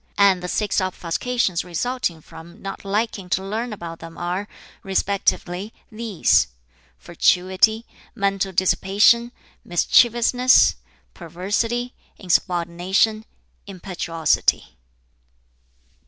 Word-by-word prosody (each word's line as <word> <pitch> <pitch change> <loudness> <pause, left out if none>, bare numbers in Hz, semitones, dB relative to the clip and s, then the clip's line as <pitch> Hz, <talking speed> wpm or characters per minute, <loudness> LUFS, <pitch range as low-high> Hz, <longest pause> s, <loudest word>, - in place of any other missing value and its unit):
And 195 -3 +4
the 180 - -5
six 210 +2 0
obfuscations 185 +2 -1
resulting 180 -1 -3
from 170 +6 -14
not 195 -1 -7
liking 200 -2 -2
to 190 +2 0
learn 225 +4 -3
about 170 -5 -8
them 165 0 -11
are, 180 +4 -3 0.3
respectively, 195 0 -1 0.2
these: 220 -4 +2 0.5
fatuity, 185 - +2 0.3
mental 195 -2 -1
dissipation, 200 +6 +3 0.3
mischievousness, 240 +7 +4 0.4
perversity, 205 +8 -3 0.2
insubordination, 180 +4 0 0.4
impetuosity." 175 - -1
195 Hz, 80 wpm, -22 LUFS, 175-220 Hz, 0.5 s, And